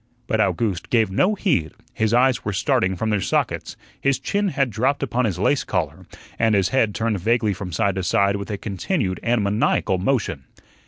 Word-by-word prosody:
But 110 -3 -1
Owgooste 105 -6 -1
gave 110 -5 +2
no 185 - +2
heed; 120 - 0 0.2
his 110 -1 0
eyes 125 +1 +3
were 100 - -2
starting 95 0 +1
from 110 +4 -2
their 105 -2 +1
sockets, - - -1 0.2
his 140 -1 +2
chin 205 0 -1
had 135 -8 0
dropped 130 +7 0
upon 125 -1 0
his 100 -6 -1
lace 120 +9 +1
collar, - - -3 0.3
and 110 -1 +3
his 95 -2 +2
head 115 -6 +1
turned 110 -3 -1
vaguely 110 +2 +1
from 95 -1 -6
side 100 +1 +1
to 95 0 -3
side 100 +2 +2
with 100 +1 -7
a 105 - -3
continued 100 - -2
and 120 -2 +1
maniacal 100 -2 +1
motion. 100 - -1
110 Hz, 195 wpm, -22 LUFS, 100-125 Hz, 0.3 s, eyes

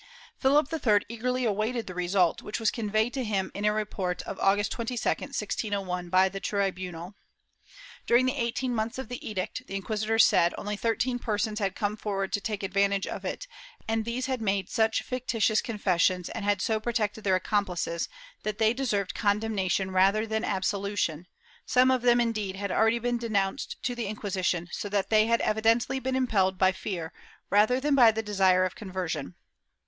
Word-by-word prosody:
Philip 285 +3 +3
III 220 -10 +3
eagerly 250 +2 -1
awaited 220 +2 -1
the 185 - -7
result, 180 -1 +1
which 210 - -4
was 225 -2 +2
conveyed 215 +1 0
to 265 - -2
him 200 -4 -1
in 205 - -3
a 210 - +4
report 200 -4 -2
of 195 - -7
August 205 +2 +2
22, 235 +1 -3
1601, 200 -8 -2
by 185 +1 +5
the 195 +1 -5
tribunal. 185 -3 -3 0.9
During 240 +2 +5
the 255 - 0
eighteen 245 +2 -1
months 225 +1 -2
of 265 -4 -6
the 245 - -6
edict, 215 +5 -4
the 195 - -6
inquisitors 215 +3 +2
said, 170 +1 +3
only 210 0 -3
thirteen 245 +3 0
persons 215 -1 -1
had 195 -3 -1
come 210 -1 -1
forward 195 -2 -3
to 205 - 0
take 210 -1 -3
advantage 200 0 +1
of - - -6
it - - -4 0.4
and 225 0 0
these 235 +3 -3
had 260 -3 -2
made 195 -3 -1
such 220 -1 +1
fictitious 230 -4 0
confessions, 185 -4 +1
and 225 - -5
had 205 -1 +1
so 220 -1 +1
protected 220 -2 -2
their 190 -2 +3
accomplices, 185 -4 -1 0.3
that 215 -1 -3
they 220 +1 +3
deserved 215 -7 -1
con 205 -1 +1
demnation 195 -3 -1
rather 195 +4 +3
than 220 0 -2
absolution; 195 -4 -1 0.4
some 255 +1 +4
of 255 -1 +2
them, 240 0 +4
indeed, 215 -5 -1
had 200 0 -3
already 225 +3 +3
been 240 0 -1
denounced 210 +1 -1
to 245 - -1
the 240 -3 -3
Inquisition, 185 -4 -2
so 205 - -4
that 200 0 -1
they 215 0 +5
had 230 0 +2
evi 215 +1 0
dently 235 +4 +2
been 260 0 -1
impelled 200 -8 +1
by 190 0 +4
fear 180 -4 -5 0.4
rather 215 +5 +4
than 290 +2 +1
by 245 -5 +7
the 220 +1 -3
desire 190 -3 +3
of 185 - -3
conver 190 -3 -4
sion. 145 - -4
210 Hz, 185 wpm, -28 LUFS, 195-230 Hz, 0.9 s, by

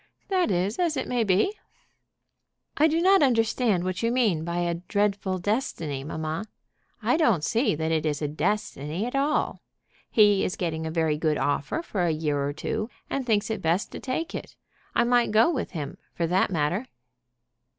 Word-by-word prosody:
"That 370 -2 +2
is 190 - 0
as 335 -5 +1
it 260 - -2
may 245 -2 +1
be." 200 - +2 1.2
"I 310 - +5
do 325 +2 +1
not 385 0 +6
understand 225 -6 +2
what 185 +1 -2
you 230 0 +1
mean 220 -11 +2
by 170 +1 -2
a 175 -1 0
dreadful 200 -2 0
destiny, 175 - -2
mamma. 160 +5 -4 0.6
I - - +3
don't 230 - +3
see 230 - +1
that 160 +1 -1
it 160 -2 +1
is 150 -2 -1
a 150 - -1
destiny 175 0 -2
at 245 - -4
all. 285 +3 0 0.5
He 205 -3 +5
is 185 - -1
getting 160 -4 -2
a - - -2
very 160 -2 0
good 155 -2 +1
offer 145 - -1
for 195 - -2
a 175 - +2
year 150 -3 0
or 140 - -1
two, 215 +9 -3 0.2
and 270 -2 -2
thinks 210 -1 +1
it 220 -3 -3
best 170 +4 0
to - - -7
take 300 +6 -3
it. - - -7 0.4
I - - +4
might 240 0 +3
go 220 +9 +4
with 270 -9 -2
him, 145 -5 -6 0.2
for 170 - 0
that 180 +3 +2
matter." 175 - -1
195 Hz, 185 wpm, -26 LUFS, 160-240 Hz, 1.2 s, not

